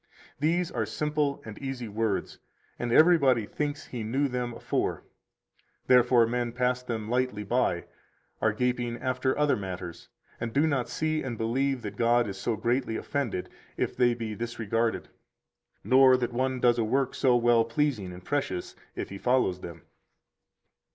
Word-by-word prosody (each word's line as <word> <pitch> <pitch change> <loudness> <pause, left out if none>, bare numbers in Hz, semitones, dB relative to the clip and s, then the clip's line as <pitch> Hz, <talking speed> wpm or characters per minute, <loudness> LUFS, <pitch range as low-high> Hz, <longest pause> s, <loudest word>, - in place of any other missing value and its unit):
These 165 +4 +1
are 110 -3 -2
simple 150 -2 -1
and 105 -2 -8
easy 135 -3 -5
words, 110 -1 -2 0.4
and 120 -1 -2
everybody 140 -7 +5
thinks 145 +5 -3
he 120 - -6
knew 130 +7 0
them 125 -2 -3
afore; - - -2 0.8
therefore 125 -1 +5
men 120 0 -2
pass 125 0 0
them 115 -4 -4
lightly 125 -3 0
by, 105 -5 0 0.6
are - - +3
gaping 125 -1 -1
after 130 +1 -1
other 150 -1 +3
matters, 90 -3 -7 0.3
and 115 -1 -4
do 145 +3 +3
not 140 -6 0
see 155 0 -1
and 120 -4 -4
believe 125 +3 0
that - - -6
God 120 0 +3
is 95 -1 -6
so 115 - -1
greatly 120 +1 0
offended 125 -10 -2 0.3
if - - -1
they 120 -1 +3
be 115 -2 -4
disregarded, 115 0 -2 0.7
nor 130 0 +6
that 125 -1 -2
one 130 +1 0
does 120 -1 +3
a - - +2
work 130 +4 0
so 130 -3 +3
well 120 -1 +4
pleasing 115 -5 -1
and 90 0 -11
precious 115 -11 -2 0.2
if - - -4
he 100 - -8
follows 120 -8 +1
them. 85 -1 -9
120 Hz, 160 wpm, -28 LUFS, 115-130 Hz, 0.8 s, nor